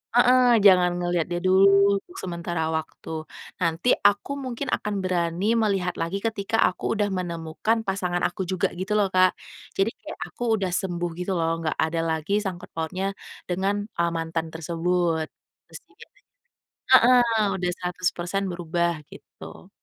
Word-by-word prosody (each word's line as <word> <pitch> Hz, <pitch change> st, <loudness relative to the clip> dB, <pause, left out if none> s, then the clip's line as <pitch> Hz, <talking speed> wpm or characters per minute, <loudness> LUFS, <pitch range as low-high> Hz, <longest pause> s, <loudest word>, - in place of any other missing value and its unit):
heeh, 245 Hz, 0 st, +6 dB
jangan 180 Hz, -3 st, +6 dB
ngelihat 175 Hz, -2 st, -1 dB
dia 175 Hz, 0 st, -3 dB
dulu 190 Hz, +1 st, +5 dB, 0.3 s
untuk 355 Hz, -, -19 dB
sementara 170 Hz, -2 st, -3 dB
waktu. 160 Hz, 0 st, -5 dB, 0.3 s
Nanti 170 Hz, +7 st, +1 dB, 0.2 s
aku 205 Hz, +7 st, 0 dB
mungkin 260 Hz, +1 st, -4 dB
akan 205 Hz, -2 st, -2 dB
berani 185 Hz, +5 st, 0 dB
melihat 195 Hz, -5 st, +1 dB
lagi 190 Hz, +4 st, -3 dB
ketika 220 Hz, -1 st, -2 dB
aku 180 Hz, +4 st, -2 dB
udah 205 Hz, -2 st, 0 dB
menemukan 180 Hz, +5 st, -2 dB
pasangan 185 Hz, -3 st, -2 dB
aku 180 Hz, 0 st, -1 dB
juga 185 Hz, -1 st, 0 dB
gitu 205 Hz, +3 st, -1 dB
loh, 200 Hz, -2 st, +2 dB
Kak. 185 Hz, 0 st, +4 dB, 0.4 s
Jadi 195 Hz, +4 st, +1 dB
kayak 315 Hz, -, -8 dB
aku -, -, -8 dB
udah 190 Hz, -3 st, -2 dB
sembuh 175 Hz, -1 st, -2 dB
gitu 180 Hz, +2 st, -2 dB
loh, 165 Hz, 0 st, 0 dB
nggak 160 Hz, -1 st, -2 dB
ada 165 Hz, +1 st, -1 dB
lagi 160 Hz, +6 st, 0 dB
sangkut 180 Hz, -3 st, -6 dB
pautnya 185 Hz, +4 st, -2 dB, 0.4 s
dengan, 190 Hz, +3 st, 0 dB, 0.2 s
eee, 170 Hz, 0 st, 0 dB
mantan 165 Hz, 0 st, -3 dB
tersebut. 165 Hz, 0 st, 0 dB, 0.4 s
Terus -, -, -11 dB
juga -, -, -17 dB, 0.9 s
heeh, 250 Hz, 0 st, +7 dB, 0.4 s
udah 180 Hz, -1 st, -1 dB
100% 180 Hz, +1 st, -2 dB
berubah, 170 Hz, 0 st, -1 dB, 0.2 s
gitu. -, -, -13 dB
180 Hz, 145 wpm, -25 LUFS, 170-200 Hz, 0.9 s, heeh